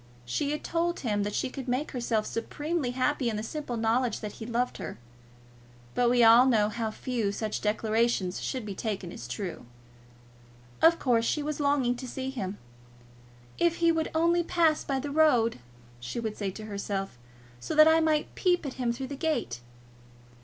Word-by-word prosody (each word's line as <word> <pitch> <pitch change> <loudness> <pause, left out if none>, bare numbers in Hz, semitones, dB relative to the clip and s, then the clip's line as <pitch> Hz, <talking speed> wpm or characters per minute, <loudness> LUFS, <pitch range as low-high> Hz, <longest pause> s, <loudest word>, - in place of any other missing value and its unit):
She 200 - -1
had 300 +1 -3
told 340 +1 -1
him 210 -5 0
that 205 0 -2
she - - -1
could 265 -1 -7
make 255 +5 -1
herself 235 -4 -1
supremely 295 +4 -2
happy 255 0 0
in 220 - -2
the 210 - -3
simple 250 0 -4
knowledge 230 +2 +1
that 210 -2 -4
he 220 - -5
loved 245 +1 -1
her. - - -6 1.0
But 245 -1 +3
we 245 -1 +4
all 230 +3 +8
know 215 -4 +3
how 225 0 -2
far 225 -2 -2
such 215 +1 -3
declarations 215 -3 0
should 255 -4 -3
be 205 - -4
taken 195 -3 -4
as 120 - -8
true. 165 - -5 1.1
Of 335 +1 +6
course, 235 -6 +2
she 300 +5 0
was 300 0 -3
longing 280 -4 +2
to 255 - -7
see 265 +1 -4
him. 200 -6 -4 1.0
"If 340 -1 +3
he 335 -1 +3
would 325 -1 0
only 340 +2 +3
pass 330 -2 +2
by 275 - -1
the 285 +2 -4
road," 260 - +3 0.4
she 120 - -5
would 220 -2 -3
say 200 -2 -2
to 215 +3 -8
herself, 200 - -4 0.4
"so 120 - -4
that 310 +1 +8
I 320 0 +6
might 310 -2 +1
peep 355 -3 +1
at 270 - -4
him 240 -1 +1
through 260 +3 -4
the 280 - -6
gate!" 250 - -2
245 Hz, 185 wpm, -28 LUFS, 215-295 Hz, 1.1 s, all